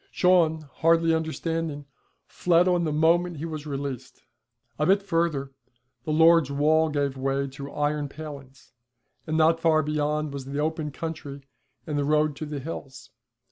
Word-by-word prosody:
Shawn, 170 - +3 0.2
hardly 165 0 +3
understanding, 160 -2 -2 0.4
fled 175 0 +2
on 175 -2 +2
the 155 - -1
moment 165 +3 +2
he 155 - -5
was 155 -2 -6
released. 135 -3 -6 0.6
A 150 - +2
bit 195 +1 +3
further 165 -7 -1 0.5
the 155 - -2
lord's 165 -1 +5
wall 155 +3 +2
gave 145 -2 -1
way 135 +1 -1
to 140 +1 -9
iron 145 0 -1
palings, 140 -4 -10 0.6
and 155 0 0
not 165 +1 +4
far 160 -1 +3
beyond 150 0 -1
was 140 -2 -6
the 140 +1 -5
open 155 0 -1
country 145 -2 -7 0.4
and 150 -2 -2
the - - +1
road 150 0 +2
to 155 - -5
the 150 -1 -5
hills. 135 -4 -8
155 Hz, 155 wpm, -26 LUFS, 140-165 Hz, 0.6 s, lord's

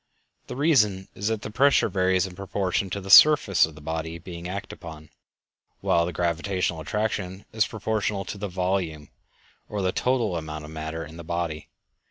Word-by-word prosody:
The - - -6
reason 110 - +2
is 100 - -3
that 110 -2 -1
the - - -6
pressure 140 +5 +4
varies 95 0 +2
in 95 - -7
proportion 95 0 -2
to 100 - -3
the 95 0 -5
surface 110 - +7
of 80 - -13
the 75 - -12
body 80 +2 -4 0.3
acted 100 +2 -5
upon, 75 -1 -11 0.7
while 85 0 +2
the - - -3
gravitational 85 0 -1
attraction 100 +1 -3
is 110 -1 +2
proportional 105 -2 -2
to 100 +3 -6
the 105 - -3
volume, 90 -5 -2 0.6
or 105 -2 -3
the 95 - +2
total 115 -5 0
amount 75 -1 -6
of 75 - -10
matter 80 +1 -5
in 80 - -12
the 85 - -8
body. 85 -2 -3
95 Hz, 175 wpm, -25 LUFS, 80-105 Hz, 0.7 s, surface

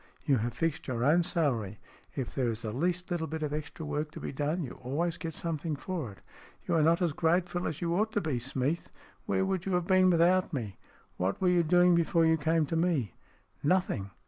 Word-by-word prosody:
You 140 -3 +3
have 115 +1 -2
fixed 165 +2 -2
your 120 -3 -1
own 155 +6 +5
salary. 125 - -1 0.4
If 130 -4 -4
there 125 -3 0
is 115 0 -4
the 110 - -3
least 175 +7 -1
little 165 -2 -1
bit 155 +1 -4
of 150 -1 -2
extra 150 +1 -5
work 150 +1 -2
to - - -7
be - - -5
done, 150 +5 -1
you 125 - -6
always 160 +7 -1
get 165 -3 -5
something 165 -2 -2
for 155 - -4
it. 100 - -16 0.5
You - - 0
are 165 - +4
not 165 +4 +3
as 165 -4 +1
grateful 175 +2 +1
as 155 - -5
you 170 -1 0
ought 215 +5 +1
to 205 - +1
be, 150 -8 -1
Smeath. 130 +6 -2 0.4
Where 190 - +1
would 190 -1 -2
you 190 - 0
have 180 -1 +1
been 185 0 +5
without 180 +1 +3
me? 110 -8 -4 0.4
What 95 +2 -1
were 185 - +3
you 180 -1 +4
doing 175 +2 +5
before 170 0 +3
you 160 0 +4
came 160 +1 +2
to 155 - -3
me?" 160 - +1 0.2
" - - -37
Nothing. 175 - -1
160 Hz, 225 wpm, -30 LUFS, 135-175 Hz, 0.5 s, own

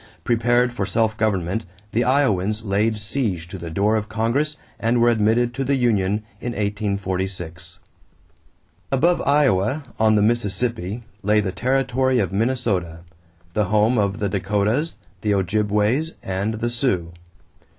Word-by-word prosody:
Prepared 120 +1 +2
for - - -2
self 110 -2 +1
government, 105 -1 0 0.3
the 115 +3 +1
Iowans 110 -6 +1
laid 105 +2 +1
siege 105 -5 -2
to 95 - -7
the 85 0 -6
door 100 +6 +1
of 105 0 -4
Congress 120 +8 0 0.2
and 115 +1 +1
were 120 0 +5
admitted 115 +2 +2
to 135 +2 -2
the 140 +1 +1
union 105 -5 +1 0.2
in 120 - -4
1846. 95 -5 -3 1.1
Above 170 +7 +3
Iowa, 140 -2 +2 0.2
on 110 -1 +4
the 105 - +3
Mississippi, 115 -1 0 0.2
lay 105 +2 +3
the 95 -3 -1
territory 130 +5 +1
of 110 - 0
Minnesota 100 -7 -1 0.5
the 105 +2 +1
home 110 +4 +3
of 100 -1 0
the 105 - -1
Dakotas, 105 - 0 0.3
the 105 -1 +1
Ojibways, 105 - +1
and 95 +4 -2
the 120 +2 -2
Sioux. 100 - 0
110 Hz, 140 wpm, -22 LUFS, 100-120 Hz, 1.1 s, were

